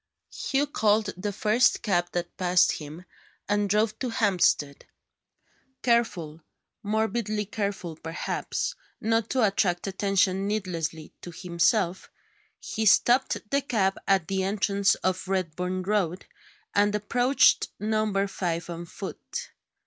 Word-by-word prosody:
Hugh 275 Hz, +2 st, 0 dB
called 215 Hz, -6 st, +1 dB
the 205 Hz, +3 st, -3 dB
first 215 Hz, +4 st, +2 dB
cab 175 Hz, -5 st, +1 dB
that 175 Hz, -1 st, -3 dB
passed 180 Hz, -1 st, +3 dB
him, 155 Hz, +4 st, -8 dB, 0.4 s
and 205 Hz, 0 st, +1 dB
drove 215 Hz, +2 st, +1 dB
to 255 Hz, -, -2 dB
Hampstead. 180 Hz, -10 st, +1 dB, 1.0 s
Careful 185 Hz, -10 st, 0 dB, 0.4 s
morbidly 215 Hz, 0 st, -1 dB
careful, 200 Hz, -5 st, -3 dB
perhaps 165 Hz, +1 st, -3 dB, 0.3 s
not 225 Hz, 0 st, 0 dB
to 255 Hz, -4 st, +3 dB
attract 190 Hz, -3 st, +1 dB
attention 195 Hz, 0 st, +1 dB
needlessly 170 Hz, -6 st, -3 dB
to -, -, -8 dB
himself, 180 Hz, +2 st, 0 dB, 0.5 s
he 220 Hz, -, -2 dB
stopped 245 Hz, +2 st, +3 dB
the 280 Hz, 0 st, +2 dB
cab 200 Hz, -8 st, 0 dB
at 190 Hz, -4 st, +3 dB
the 190 Hz, -1 st, -1 dB
entrance 200 Hz, 0 st, +2 dB
to 185 Hz, 0 st, +2 dB
Redburn 185 Hz, 0 st, -2 dB
Road, 190 Hz, -3 st, -1 dB, 0.5 s
and 205 Hz, +1 st, +3 dB
approached 245 Hz, +6 st, +3 dB
Number 215 Hz, -2 st, 0 dB
Five 175 Hz, -3 st, -3 dB
on 170 Hz, 0 st, -6 dB
foot. -, -, -7 dB
200 Hz, 120 wpm, -27 LUFS, 180-215 Hz, 1.0 s, passed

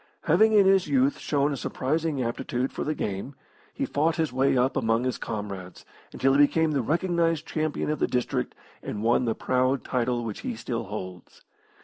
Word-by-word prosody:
Having 215 Hz, +8 st, +4 dB
in 205 Hz, -2 st, +6 dB
his 190 Hz, -2 st, +4 dB
youth 140 Hz, -1 st, +2 dB
shown 145 Hz, 0 st, 0 dB
a -, -, -2 dB
surprising 145 Hz, +2 st, -1 dB
aptitude 120 Hz, +2 st, -2 dB
for -, -, -4 dB
the 155 Hz, -, -2 dB
game, 100 Hz, +6 st, -4 dB, 0.4 s
he -, -, -2 dB
fought 160 Hz, +3 st, +1 dB
his 160 Hz, -6 st, -1 dB
way 135 Hz, 0 st, +2 dB
up 125 Hz, +2 st, +2 dB
among 115 Hz, -2 st, +1 dB
his 130 Hz, 0 st, -2 dB
comrades, 100 Hz, -4 st, -6 dB, 0.3 s
until 135 Hz, 0 st, +2 dB
he 140 Hz, -, +3 dB
became 155 Hz, +2 st, +4 dB
the 140 Hz, -3 st, +1 dB
recognised 165 Hz, +2 st, 0 dB
champion 155 Hz, -1 st, -2 dB
of 150 Hz, -, -2 dB
the -, -, +2 dB
district 125 Hz, -, -2 dB, 0.3 s
and 105 Hz, 0 st, -5 dB
won 120 Hz, +2 st, +3 dB
the 115 Hz, -, 0 dB
proud 130 Hz, +1 st, +1 dB
title 120 Hz, -1 st, -1 dB
which 110 Hz, -, -5 dB
he 250 Hz, -2 st, -4 dB
still 120 Hz, -, -4 dB
holds. 95 Hz, -3 st, -8 dB
135 Hz, 190 wpm, -26 LUFS, 120-155 Hz, 0.4 s, in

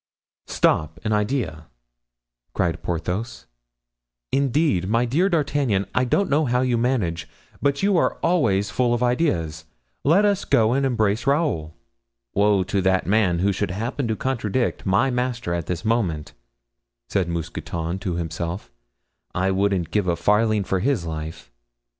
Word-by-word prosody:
"Stop—an 80 Hz, +7 st, 0 dB
idea!" 105 Hz, -, -1 dB, 0.9 s
cried -, -, 0 dB
Porthos; 90 Hz, +7 st, -3 dB, 0.9 s
"indeed, 135 Hz, -, +1 dB
my 115 Hz, +3 st, +2 dB
dear 160 Hz, +11 st, +2 dB
D'Artagnan, 145 Hz, -, +1 dB
I 130 Hz, -, +2 dB
don't 195 Hz, +11 st, +1 dB
know 150 Hz, +2 st, +2 dB
how 125 Hz, 0 st, +1 dB
you 125 Hz, -2 st, +1 dB
manage, 110 Hz, -10 st, -1 dB, 0.3 s
but 140 Hz, +4 st, +1 dB
you 200 Hz, -1 st, +3 dB
are -, -, +2 dB
always 115 Hz, -, +2 dB
full 120 Hz, -1 st, +2 dB
of 120 Hz, -, -1 dB
ideas; 120 Hz, -, 0 dB, 0.4 s
let 185 Hz, +8 st, +4 dB
us 205 Hz, -1 st, +1 dB
go 110 Hz, 0 st, +3 dB
and 135 Hz, +1 st, +2 dB
embrace 110 Hz, 0 st, 0 dB
Raoul." 140 Hz, -, 0 dB, 0.6 s
"Woe 100 Hz, -1 st, +3 dB
to 100 Hz, +1 st, -1 dB
that 95 Hz, 0 st, +2 dB
man 100 Hz, -4 st, +2 dB
who 100 Hz, -, +3 dB
should 100 Hz, +1 st, -2 dB
happen 115 Hz, +7 st, -3 dB
to 110 Hz, -, 0 dB
contradict 120 Hz, -2 st, -1 dB
my 100 Hz, +8 st, +3 dB
master 125 Hz, -7 st, -2 dB
at 85 Hz, -1 st, -3 dB
this 90 Hz, +4 st, -3 dB
moment," 95 Hz, -10 st, -1 dB, 0.7 s
said 95 Hz, -4 st, 0 dB
Mousqueton 85 Hz, +1 st, -4 dB
to 95 Hz, -3 st, -3 dB
himself; 85 Hz, 0 st, -4 dB, 0.6 s
"I 95 Hz, +1 st, +1 dB
wouldn't 95 Hz, -3 st, 0 dB
give 105 Hz, -3 st, +1 dB
a 85 Hz, -, +2 dB
farthing 105 Hz, +3 st, +2 dB
for 95 Hz, 0 st, -1 dB
his 120 Hz, -4 st, 0 dB
life." 80 Hz, -5 st, -6 dB
105 Hz, 145 wpm, -23 LUFS, 90-130 Hz, 0.9 s, let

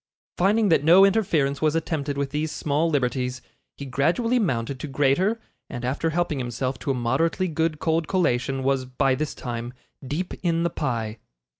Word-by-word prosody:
Finding 205 Hz, +3 st, +3 dB
that 160 Hz, -, +3 dB
no 175 Hz, +5 st, +7 dB
interference 165 Hz, -9 st, +1 dB
was 155 Hz, 0 st, +2 dB
attempted 150 Hz, -3 st, -2 dB
with 140 Hz, -1 st, -2 dB
these 150 Hz, +1 st, -2 dB
small 150 Hz, +3 st, 0 dB
liberties, 125 Hz, -3 st, -1 dB, 0.4 s
he 140 Hz, -, -6 dB
gradually 175 Hz, -, +1 dB
mounted 130 Hz, -, -1 dB
to 150 Hz, -, -5 dB
greater, 145 Hz, +11 st, +1 dB, 0.3 s
and, 120 Hz, 0 st, -5 dB
after 140 Hz, +6 st, 0 dB
helping 160 Hz, -3 st, -1 dB
himself 125 Hz, +1 st, -3 dB
to -, -, -5 dB
a 135 Hz, -, +2 dB
moderately 150 Hz, +10 st, 0 dB
good 160 Hz, -1 st, -1 dB
cold 160 Hz, +1 st, 0 dB
collation, 135 Hz, -7 st, 0 dB
was, 135 Hz, -1 st, +1 dB
by 130 Hz, +1 st, +1 dB
this 150 Hz, +3 st, -3 dB
time, 120 Hz, 0 st, -5 dB, 0.3 s
deep 155 Hz, +7 st, -3 dB
in 170 Hz, -2 st, +1 dB
the 170 Hz, -, 0 dB
pie. 115 Hz, -7 st, -3 dB
145 Hz, 170 wpm, -24 LUFS, 130-165 Hz, 0.4 s, no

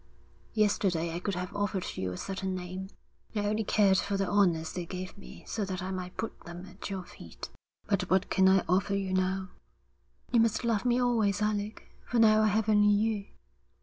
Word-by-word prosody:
'Yesterday 185 Hz, -6 st, +1 dB
I 170 Hz, -, -2 dB
could 195 Hz, +1 st, -2 dB
have 180 Hz, +3 st, -5 dB
offered 205 Hz, -2 st, -1 dB
you 95 Hz, -1 st, -2 dB
a 90 Hz, -, -6 dB
certain 190 Hz, -, -3 dB
name. 185 Hz, +1 st, -6 dB, 0.5 s
I 205 Hz, -1 st, 0 dB
only 215 Hz, +2 st, +1 dB
cared 195 Hz, -2 st, +4 dB
for 200 Hz, 0 st, -1 dB
the 195 Hz, -1 st, 0 dB
honours 175 Hz, -6 st, +2 dB
they 175 Hz, -2 st, -4 dB
gave 185 Hz, 0 st, -6 dB
me 200 Hz, -, -12 dB
so 220 Hz, -, -2 dB
that 185 Hz, -2 st, -3 dB
I 190 Hz, -, -3 dB
might 180 Hz, -1 st, -5 dB
put 225 Hz, -, -4 dB
them 175 Hz, +1 st, -9 dB
at 195 Hz, -, -8 dB
your 190 Hz, -2 st, -4 dB
feet. 85 Hz, -, -10 dB, 0.4 s
But 195 Hz, -3 st, 0 dB
what 190 Hz, +1 st, +2 dB
can 190 Hz, -1 st, +5 dB
I 190 Hz, -1 st, +4 dB
offer 195 Hz, +2 st, +2 dB
you 195 Hz, -1 st, -2 dB
now?' 185 Hz, 0 st, 0 dB, 0.8 s
'You 240 Hz, -, +4 dB
must 225 Hz, 0 st, +2 dB
love 230 Hz, -1 st, +1 dB
me 245 Hz, 0 st, +3 dB
always, 225 Hz, -5 st, +2 dB
Alec, 210 Hz, 0 st, -2 dB, 0.2 s
for 240 Hz, -, -2 dB
now 215 Hz, -1 st, +6 dB
I 215 Hz, -, +4 dB
have 215 Hz, +1 st, +1 dB
only 210 Hz, -1 st, +5 dB
you.' 205 Hz, 0 st, +1 dB
195 Hz, 200 wpm, -30 LUFS, 185-210 Hz, 0.8 s, now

